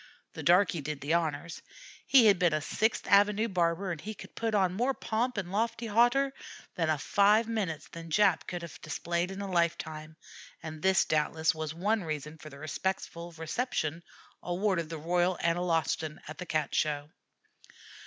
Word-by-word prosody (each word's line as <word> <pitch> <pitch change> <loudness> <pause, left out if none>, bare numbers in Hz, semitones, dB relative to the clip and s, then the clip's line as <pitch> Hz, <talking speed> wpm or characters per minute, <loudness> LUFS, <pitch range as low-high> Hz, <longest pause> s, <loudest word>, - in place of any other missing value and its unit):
The - - -6
darkey 175 -2 +4
did 150 0 -4
the 145 +4 -1
honors. 165 0 -1 0.5
He 260 -4 +7
had 200 -4 +5
been 175 -3 +3
a 155 - +2
Sixth 220 +9 0
Avenue 205 +2 +4
barber, 180 -1 0
and 165 -3 -5
he 215 +1 -6
could - - -12
put 225 -1 -1
on 190 -3 +2
more 250 +7 0
pomp 235 +2 -1
and 185 -3 -3
lofty 230 +3 -1
hauteur 245 +5 +3 0.4
in 155 -3 +1
five 205 +9 +3
minutes 200 -9 -3
than 165 0 -9
Jap 190 +1 +4
Malee - - -16
could 175 -1 -4
have 165 -7 -10
displayed 170 +4 -2
in 195 +1 -6
a 200 -1 -5
lifetime, 160 -2 -1 0.5
and 155 -1 -7
this, 190 +1 +4
doubtless, 160 +1 +1
was 155 -1 -5
one 205 +4 0
reason 155 0 -5
for 155 - -10
the 140 - -12
respectful 170 +2 -4
reception 160 - -2 0.4
awarded 180 -2 -1
the 165 - -5
Royal 175 +3 +1
Analostan 165 -2 0
at 155 - -9
the 180 - -6
Cat 155 -2 -1
Show. 150 0 -1
175 Hz, 175 wpm, -30 LUFS, 155-205 Hz, 0.5 s, He